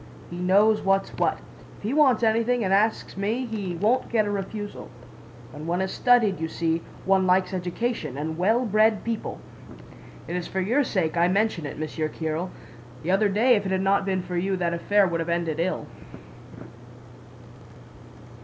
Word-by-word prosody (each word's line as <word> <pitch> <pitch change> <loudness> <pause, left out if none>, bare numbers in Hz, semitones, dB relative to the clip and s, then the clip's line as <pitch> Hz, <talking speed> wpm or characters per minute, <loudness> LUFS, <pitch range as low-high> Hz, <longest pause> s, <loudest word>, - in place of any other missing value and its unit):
He 175 - -6
knows 205 +4 +4
what's 195 0 +1
what.... - - +1 0.4
If - - -18
he 220 +5 -1
wants 270 -6 +4
anything 230 +2 +2
and 190 -1 +1
asks 215 +3 +1
me, 220 +6 -1
he 205 -6 -4
won't 220 +9 +1
get 220 -3 +2
a 205 - -2
refusal. 205 +1 -5 0.6
When 150 +4 -8
one 175 +1 0
has 190 0 -1
studied, 230 -7 +3
you 160 - -2
see, 165 0 -1 0.2
one 190 -1 +3
likes 185 +1 +2
education 180 - -3
and 155 +2 -3
well 220 +9 +2
bred 215 0 +3
people.' 230 -1 -4 0.9
It 175 - -4
is 180 -1 -3
for 190 - -3
your 235 +10 +2
sake 175 -9 -1
I 170 +1 +4
mention 195 -4 0
it, - - -8
Monsieur 155 0 -3
Kiril. 160 +3 -3 0.5
The 175 - -1
other 200 +2 +3
day 235 +5 +4
if 205 -2 -1
it - - -3
had 190 0 +1
not 195 +1 +2
been 190 -2 -1
for 180 - -6
you 190 +2 0
that 175 -1 -1
affair 200 +4 +2
would 170 -2 -1
have 165 +1 -3
ended 170 -2 -1
ill." 185 +2 -1
195 Hz, 180 wpm, -25 LUFS, 175-220 Hz, 0.9 s, knows